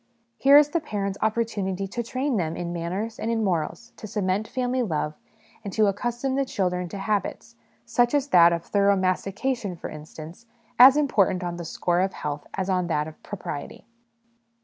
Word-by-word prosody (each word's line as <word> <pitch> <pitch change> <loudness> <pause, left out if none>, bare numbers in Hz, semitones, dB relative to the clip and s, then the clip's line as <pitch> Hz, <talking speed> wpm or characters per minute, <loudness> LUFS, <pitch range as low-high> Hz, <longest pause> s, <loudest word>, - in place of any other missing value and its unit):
Here 280 +1 +7
is 295 0 +6
the 335 - 0
parents' 200 -9 -4
opportunity 205 -4 -1
to 240 - -3
train 255 +2 -1
them 165 -3 -2
in 175 0 -4
manners 185 +7 -4
and 225 - -2
in 225 -1 0
morals, 190 +5 -2
to 215 - -8
cement 200 +1 -1
family 255 0 -1
love, 155 -8 -1 0.5
and 200 - -5
to 215 - +3
accustom 240 +6 -1
the 275 +1 +1
children 180 -7 -2
to 200 - -6
habits, 205 +1 -3 0.3
such 245 +3 +2
as 285 0 0
that 170 -5 +7
of 170 -1 -2
thorough 200 0 +3
mastication, 195 +3 -1
for - - -7
instance, 155 +7 -10 0.3
as 265 +3 +9
important 200 -10 +2
on 175 -1 -4
the 170 - -6
score 175 +1 0
of 190 +1 0
health 145 0 -5
as 190 -1 -2
on 180 -2 0
that 150 -2 0
of 160 - -12
propriety. 185 -6 -7
200 Hz, 180 wpm, -25 LUFS, 175-235 Hz, 0.5 s, as